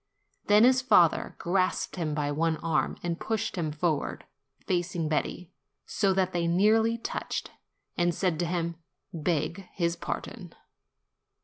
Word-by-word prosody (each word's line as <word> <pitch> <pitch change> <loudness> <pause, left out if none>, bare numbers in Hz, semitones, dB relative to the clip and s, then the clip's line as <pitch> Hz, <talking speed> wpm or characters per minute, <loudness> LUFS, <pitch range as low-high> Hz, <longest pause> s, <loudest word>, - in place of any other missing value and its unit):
Then 210 +1 +6
his 255 +1 +5
father 205 -10 +3
grasped 185 +1 0
him 160 -5 -2
by 145 -1 -1
one 160 +2 0
arm 160 0 0
and 170 -1 -2
pushed 225 -1 -2
him 165 -4 -2
forward, 150 -1 -2 0.4
facing 175 -3 -1
Betti, 160 +3 -2 0.3
so 195 -2 +1
that 185 -1 +1
they 170 -1 0
nearly 220 +6 +3
touched, 230 - -4 0.5
and 175 0 +3
said 170 -2 -1
to 175 - 0
him, 170 -1 -2 0.4
"Beg 165 +2 -2
his 170 -2 0
pardon." 170 - -6
175 Hz, 135 wpm, -28 LUFS, 165-195 Hz, 0.5 s, Then